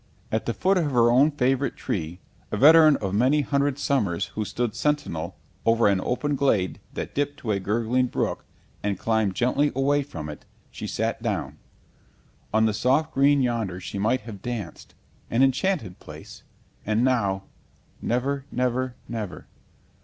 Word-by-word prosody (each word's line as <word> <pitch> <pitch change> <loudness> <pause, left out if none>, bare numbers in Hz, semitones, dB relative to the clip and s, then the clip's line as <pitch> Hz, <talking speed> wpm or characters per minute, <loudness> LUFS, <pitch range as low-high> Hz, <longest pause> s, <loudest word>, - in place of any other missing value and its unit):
At 110 - -1
the 115 - 0
foot 190 0 +2
of 155 -4 0
her 120 -3 +4
own 135 +5 +5
favourite 135 -2 0
tree, 85 -2 -4 0.3
a - - -1
veteran 155 +1 +7
of 95 -2 -3
many 130 +8 +3
hundred 140 -1 0
summers 100 -10 0
who 110 - -2
stood 110 +2 -2
sentinel 115 - -2 0.3
over 115 0 +4
an 100 -2 +2
open 145 +6 -1
glade 110 -10 +1 0.2
that - - -5
dipped 145 0 -1
to 110 - -2
a 100 - +1
gurgling 115 +6 +1
brook - - -2 0.4
and 100 -2 -1
climbed 110 -3 0
gently 135 +4 +2
away 140 +2 +2
from 80 - -7
it, 75 - -8 0.3
she - - -6
sat - - -2
down. - - -3 0.9
On 110 +1 +3
the 110 - +1
soft 135 +8 +1
green 140 0 +4
yonder 115 -7 -1
she 95 +2 -6
might 115 +5 +1
have 105 -3 -9
danced, 115 -8 -6 0.3
an 120 +3 +3
enchanted 135 - 0
place, - - -11 0.4
and 110 +2 +1
now 100 -7 +1 0.6
never, 135 +3 -1
never, 125 0 -1
never. 110 -6 -5
120 Hz, 160 wpm, -25 LUFS, 105-140 Hz, 0.9 s, veteran